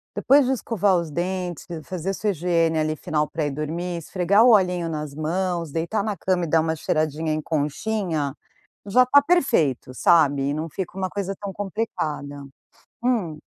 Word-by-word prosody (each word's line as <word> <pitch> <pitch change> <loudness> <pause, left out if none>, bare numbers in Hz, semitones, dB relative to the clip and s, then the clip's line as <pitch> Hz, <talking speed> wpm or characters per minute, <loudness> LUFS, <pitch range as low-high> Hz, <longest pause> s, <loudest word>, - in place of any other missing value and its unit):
depois 280 0 +4
de 260 - +1
escovar 205 -6 +1
os 170 -3 -2
dentes 180 0 -3
e 165 -3 -6
fazer 185 +3 -3
sua 210 +2 -1
higiene 165 -3 +1
ali 155 0 0
final 150 0 -1
para 160 -2 -2
ir - - -3
dormir, 165 +5 -3
esfregar 185 +6 +2
o 250 - +7
olhinho 180 -5 +3
nas 150 -3 -4
mãos, 170 +2 -2
deitar 165 +8 -1
na 210 0 -2
cama 185 -2 0
e - - -5
dar 160 +1 +3
uma 160 0 -1
cheiradinha 155 +1 -1
em 155 - -2
conchinha 155 0 -2 0.5
já 215 +5 +5
está 280 +3 +5
perfeito, 215 - +1
sabe. 145 -2 +3
Não 155 +2 -3
fica 185 +3 -6
uma 190 -1 -1
coisa 195 0 -3
tão 200 -1 -5
complicada. 155 -9 -4 0.6
Hum? 215 -11 0
170 Hz, 175 wpm, -23 LUFS, 155-195 Hz, 0.6 s, o